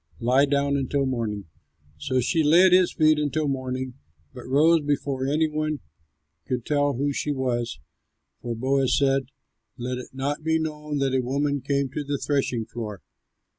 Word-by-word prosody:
Lie 130 +4 +3
down 140 0 +1
until 140 +1 0
morning." 115 -6 -2 0.5
So 130 - 0
she 160 +6 +1
lay 165 +5 +6
at 185 - +5
his 180 -1 +5
feet 155 -1 +3
until 150 +1 0
morning, 130 -1 -3 0.4
but - - -10
rose 155 +5 +4
before 140 -2 -1
any 155 +3 +2
one 155 0 -2 0.7
could 125 -3 -2
tell 145 -1 +1
who 140 +3 -1
she 150 - -2
was, 120 -4 -2 0.6
for 120 -1 -4
Boaz 130 +2 +1
said, 135 -1 +2 0.5
"Let 125 +1 -3
it 125 - -9
not 140 +3 -3
be 160 0 +2
known 150 -2 -3
that 135 -1 0
a 130 - +2
woman 140 +2 -1
came 140 +1 0
to 150 - -4
the 145 0 -2
threshing 130 -5 -1
floor." 105 -5 -7
140 Hz, 170 wpm, -25 LUFS, 130-150 Hz, 0.7 s, lay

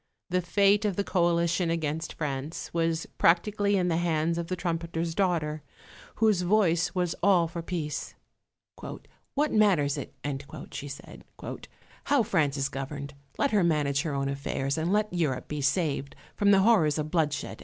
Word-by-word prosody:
The 180 0 +2
fate 200 +3 +3
of 205 -3 0
the 200 - 0
coalition 170 -1 +1
against 160 -1 -2
France 145 0 -4
was 165 -1 0
practically 200 +4 +3
in 180 -1 +1
the 165 -2 +1
hands 165 -1 0
of 170 - -3
the 185 - -2
trumpeter's 170 -1 -2
daughter, 160 -5 0 0.5
whose 215 -4 +3
voice 180 -2 +2
was 180 -2 0
all 180 -3 +4
for 170 +1 -5
peace. 165 -3 -4 1.2
"What 295 +1 +1
matters 165 -10 +3
it," - - -8 0.6
she 145 - -6
said, 140 0 -10 0.8
"how 285 -4 +3
France 155 -8 +1
is 135 0 +1
governed? 140 +1 -6 0.2
Let 280 - +1
her 205 -3 +3
manage 145 -4 +2
her 155 -3 -3
own 135 0 -1
affairs, 140 0 -2
and 165 +2 -1
let 210 -1 +1
Europe 155 -8 -1
be 150 -1 -4
saved 140 -2 0 0.2
from 205 - +2
the 195 -1 +6
horrors 190 -9 +4
of 155 0 -3
bloodshed." 155 -4 -1
170 Hz, 160 wpm, -28 LUFS, 150-185 Hz, 1.2 s, the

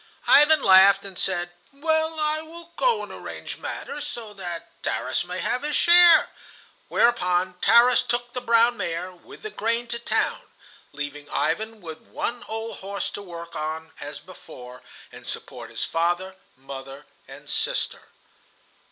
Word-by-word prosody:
Ivan 295 0 +6
laughed 195 +1 +7
and 195 -1 -7
said: 175 -1 -1 0.2
"Well, 315 +2 0
I 305 0 0
will 335 +1 -12
go 475 -3 +2
and - - -9
arrange - - -8
matters 295 0 -5
so 235 -7 -7
that 175 -4 -8
Tarras - - -1
may - - -5
have 250 - -1
his 295 0 -2
share," 345 -1 +7 0.6
whereupon 185 -6 +1
Tarras 235 +3 +6
took 240 0 -2
the 250 - -3
brown 235 0 +4
mare 170 0 -3
with 180 - -15
the 430 - -5
grain 230 - -1
to 235 - -3
town, - - -1 0.5
leaving 145 0 -6
Ivan 215 +7 -1
with 160 -2 -8
one 240 0 -4
old 225 +1 -5
horse 200 +1 -4
to - - -7
work 170 -3 -9
on 160 +1 -4
as 145 0 -7
before 125 -8 -12 0.3
and - - -12
support - - -6
his - - -3
father, 175 +3 -1 0.2
mother, 135 +1 -9 0.2
and - - -13
sister. - - -1
200 Hz, 150 wpm, -24 LUFS, 170-250 Hz, 0.6 s, laughed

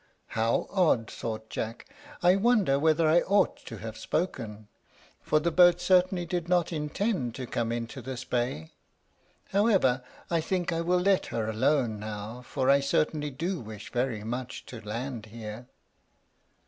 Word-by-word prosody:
"How 115 +1 +1
odd!" 160 - +2
thought 110 -1 -5
Jack. 115 +1 -4 0.4
"I 180 +1 +6
wonder 195 - +3
whether 160 +1 +3
I 160 +3 +6
ought 200 +2 +2
to 115 - -6
have 110 +2 -7
spoken; 110 - -3 0.5
for 155 - +2
the 170 +3 0
boat 175 0 +6
certainly 180 0 +3
did 175 0 -3
not 175 -1 +2
intend 150 - -1
to 130 - -5
come 115 -1 -2
into 120 +3 -4
this 130 0 -6
bay. 120 -11 -2 0.8
However, 195 - +3 0.3
I 165 -1 +2
think 175 0 -1
I 165 - 0
will 180 +2 +2
let 195 0 +2
her 110 -2 -2
alone 115 0 +1
now, 105 +3 -6
for 130 +1 -2
I 140 +1 +6
certainly 150 +2 0
do 165 +7 -3
wish 110 -3 -9
very 120 -4 -1
much 125 +3 -5
to 115 -3 -9
land 115 +1 -5
here." 110 +2 -8
135 Hz, 155 wpm, -28 LUFS, 115-175 Hz, 0.8 s, I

